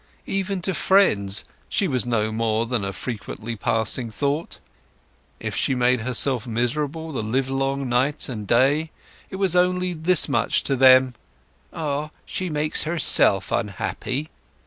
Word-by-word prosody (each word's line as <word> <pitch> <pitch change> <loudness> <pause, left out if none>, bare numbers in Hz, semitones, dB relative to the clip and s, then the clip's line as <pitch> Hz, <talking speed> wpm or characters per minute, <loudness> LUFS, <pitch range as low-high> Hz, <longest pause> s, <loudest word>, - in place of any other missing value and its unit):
Even 195 -1 -2
to 190 - 0
friends 105 - +2 0.2
she 195 - 0
was 130 -5 0
no 110 -2 0
more 110 0 0
than 120 -3 -2
a 100 - -2
frequently 115 +1 -6
passing 115 +2 -1
thought. 145 +8 -3 0.8
If - - -4
she 135 - 0
made 125 -1 +2
herself 125 +1 +1
miserable 145 +7 -2
the 135 - -3
livelong 135 +4 -1
night 130 +5 0
and 105 -6 -6
day 140 +8 +2 0.4
it - - -7
was 190 -2 0
only 180 0 +1
this 170 +1 +3
much 115 -6 +1
to 135 - 0
them—"Ah, 130 +3 +1 0.2
she 185 -1 -4
makes 150 0 0
herself 155 - +3
unhappy." 115 - -3
130 Hz, 135 wpm, -23 LUFS, 115-155 Hz, 0.8 s, this